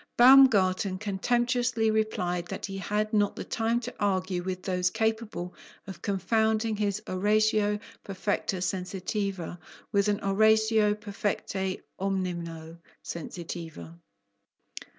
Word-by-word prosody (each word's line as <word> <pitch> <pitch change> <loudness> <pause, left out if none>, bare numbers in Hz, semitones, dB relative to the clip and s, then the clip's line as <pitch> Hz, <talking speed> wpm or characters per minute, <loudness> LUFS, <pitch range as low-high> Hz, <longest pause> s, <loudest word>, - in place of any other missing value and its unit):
Baumgarten 210 -7 +6
contemptuously 240 +3 +1
replied 180 -5 -1
that - - -5
he 195 -1 -5
had 210 +2 -1
not 205 -1 +2
the - - -5
time 230 +1 0
to 245 +1 -6
argue 185 -3 0
with 185 0 -4
those 180 -1 +1
capable 220 -4 -2 0.3
of 195 -4 -9
confounding 220 +3 +1
his 205 0 -1
oratio 210 +2 +2 0.3
perfecta 195 0 -2
sensitiva 185 -1 -3 0.3
with 200 0 +2
an 205 0 +1
oratio 220 +1 +3
perfecte 200 -2 -3 0.2
(omnino!) 170 -4 -3 0.2
sensitiva. 170 -1 -7
200 Hz, 105 wpm, -28 LUFS, 185-220 Hz, 0.3 s, Baumgarten